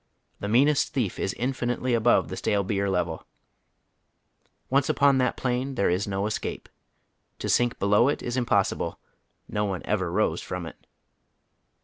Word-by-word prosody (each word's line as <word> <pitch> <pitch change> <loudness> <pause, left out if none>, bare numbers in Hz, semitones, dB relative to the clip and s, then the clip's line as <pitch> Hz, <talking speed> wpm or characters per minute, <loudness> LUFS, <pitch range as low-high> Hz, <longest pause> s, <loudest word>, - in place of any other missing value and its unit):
The 100 - -4
meanest 135 +7 +3
thief 120 -8 -1
is 95 - -2
infinitely 125 0 -1
above 120 +1 +3
the - - -4
etale 100 -2 0
beer 100 0 0
level. 90 -3 -2 1.4
Once 140 +1 +2
upon 140 -1 +4
that 125 - +1
plane 130 +2 -1
there 100 -6 +2
is 95 +4 0
no 100 0 -1
escape. 110 - -4 0.7
To - - -4
sink 120 -1 +2
below 105 +5 +3
it 145 - -1
is 120 - -3
impossible; 115 -6 0 0.5
no 105 - -1
one 95 -3 -3
ever 95 -5 -1
rose - - +1
from 90 -2 -5
it. 80 - -12
110 Hz, 150 wpm, -26 LUFS, 100-125 Hz, 1.4 s, upon